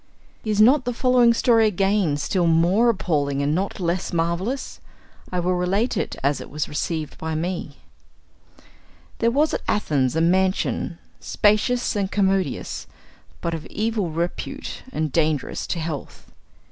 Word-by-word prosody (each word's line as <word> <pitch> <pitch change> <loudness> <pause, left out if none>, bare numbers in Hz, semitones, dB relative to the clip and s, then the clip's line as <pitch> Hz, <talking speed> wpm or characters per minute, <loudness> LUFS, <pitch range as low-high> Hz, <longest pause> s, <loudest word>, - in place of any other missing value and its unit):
Is 215 -2 -1
not 255 +5 +5
the 245 -1 -2
following 250 -1 +4
story 230 -1 +4
again 195 -5 +1
still 175 +4 0
more 175 +8 +4
appalling 145 -9 0
and 145 +1 +1
not 190 +5 -2
less 175 0 -1
marvellous? 170 +10 -2 0.5
I 180 - -1
will 180 +1 +1
relate 190 +7 0
it - - -2
as 140 +1 +1
it - - -9
was 150 -1 -3
received 155 +1 -3
by 160 0 -3
me: 165 -3 -3 1.4
There 230 - +3
was 295 +6 +2
at - - -1
Athens 145 -10 +1
a 160 - +2
mansion, 185 0 +1 0.2
spacious 215 +4 +1
and 200 -2 0
commodious, 195 -6 0 0.5
but 170 - -2
of 160 -1 -5
evil 215 -4 -1
repute 170 +2 -4
and 155 - -2
dangerous 155 -2 0
to 170 - -2
health. 160 -3 -6
180 Hz, 145 wpm, -23 LUFS, 160-215 Hz, 1.4 s, not